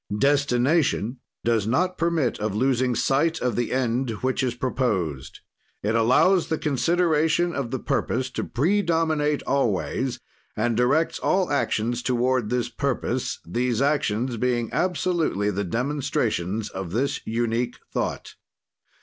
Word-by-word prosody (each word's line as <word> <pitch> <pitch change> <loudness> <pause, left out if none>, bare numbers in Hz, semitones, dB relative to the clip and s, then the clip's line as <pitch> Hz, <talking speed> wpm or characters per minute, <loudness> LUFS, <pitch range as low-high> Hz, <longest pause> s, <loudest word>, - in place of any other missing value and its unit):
"Destination 135 -2 +2 0.2
does 115 -3 +1
not 180 +10 +1
permit 165 -7 0
of 105 -1 -2
losing 130 +1 +1
sight 160 +8 +1
of 125 -3 -1
the 120 -1 -1
end 125 0 0
which 130 +1 +1
is 125 -2 -1
proposed. 105 - -2 0.4
"It 105 +2 +1
allows 130 +11 +4
the 160 - -1
consideration 165 +3 +1
of 140 -5 -3
the 130 - -2
purpose 130 +1 -1
to - - -3
predominate 160 -2 +1
always, 125 0 0 0.4
and 115 +2 +1
directs 135 +8 +2
all 185 -1 +1
actions 120 -4 0
toward 125 -2 +1
this 125 0 0
purpose, - - -2
these 120 +6 -1
actions 130 -4 0
being 120 -1 0
absolutely 170 - 0
the 100 +2 -2
demonstrations 110 - -1
of 95 -2 -6
this 135 +5 0
unique 120 +1 -1 0.2
thought. - - -3
125 Hz, 125 wpm, -24 LUFS, 115-150 Hz, 0.4 s, allows